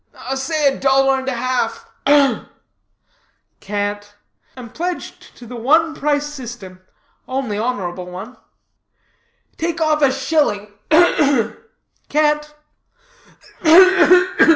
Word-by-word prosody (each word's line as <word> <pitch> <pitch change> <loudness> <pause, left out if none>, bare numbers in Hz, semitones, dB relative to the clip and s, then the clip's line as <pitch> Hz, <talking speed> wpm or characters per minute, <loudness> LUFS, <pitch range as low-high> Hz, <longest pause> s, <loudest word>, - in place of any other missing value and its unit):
"Say 280 +1 0
a - - -11
dollar 270 0 +2
and 265 - -8
half. 250 -2 -2 0.2
Ugh!" 285 -2 +3 1.1
"Can't. 205 0 -4 0.4
Am 240 -3 -10
pledged 355 +2 -6
to 245 - -12
the 245 +2 -9
one 315 +7 +2
price 290 -1 -1
system, 240 -10 -9 0.5
only 260 -5 -3
honorable 190 -7 -4
one." 185 +8 -9 1.2
"Take 335 +1 -3
off 310 -1 +1
a 275 -2 +4
shilling 265 -8 -1 0.2
ugh, 345 +3 +5
ugh!" 275 -6 +1 0.5
"Can't." 300 0 +1
265 Hz, 100 wpm, -18 LUFS, 225-300 Hz, 1.2 s, ugh